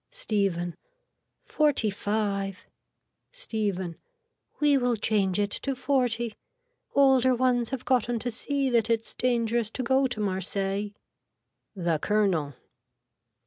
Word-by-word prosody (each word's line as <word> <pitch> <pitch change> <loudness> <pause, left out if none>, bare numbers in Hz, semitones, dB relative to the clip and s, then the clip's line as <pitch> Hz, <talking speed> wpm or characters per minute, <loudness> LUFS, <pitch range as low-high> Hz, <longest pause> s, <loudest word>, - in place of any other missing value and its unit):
(Stephen.) 175 -5 -1 0.7
Forty 290 -8 +2
five. 200 -2 -2 0.7
(Stephen.) 205 - -3 0.6
We 295 -2 +4
will 245 -3 +2
change 205 -3 +1
it 205 0 0
to 275 -1 -2
forty. 245 -4 0 0.6
Older 265 -2 +5
ones 245 -2 +1
have 260 -2 -5
gotten 245 -2 +1
to 245 +2 -3
see 275 +4 -1
that 230 -2 +2
it's 225 -1 0
dangerous 235 -2 0
to 255 - -4
go 265 +2 +3
to 245 -4 -5
Marseilles. 195 +1 -1 0.8
(The 170 -4 0
colonel.) 180 -9 +1
225 Hz, 110 wpm, -27 LUFS, 200-255 Hz, 0.8 s, Older